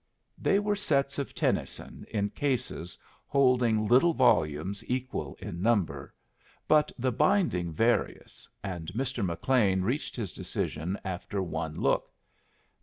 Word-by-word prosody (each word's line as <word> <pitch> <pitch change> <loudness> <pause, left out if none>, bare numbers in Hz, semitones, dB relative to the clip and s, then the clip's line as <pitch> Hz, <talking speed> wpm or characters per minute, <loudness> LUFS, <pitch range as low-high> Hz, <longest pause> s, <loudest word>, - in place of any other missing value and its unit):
They 195 - +3
were 205 0 +1
sets 140 -8 0
of 140 - -4
Tennyson - - -2
in 105 -1 -1
cases 125 - -2 0.3
holding 125 -5 +3
little 135 +8 +5
volumes 95 - +2
equal 130 +1 -3
in 90 -4 -6
number, 105 -5 0 0.6
but 150 -1 +4
the 130 +1 0
binding 150 - +2
various, 115 +9 -1
and 90 -4 -5
Mr. 130 -2 -2
McLean 95 +1 +2
reached 125 +9 -2
his 110 -7 -4
decision 85 +6 -3
after 95 +2 -4
one 80 -2 -4
look. - - 0
115 Hz, 120 wpm, -29 LUFS, 90-135 Hz, 0.6 s, little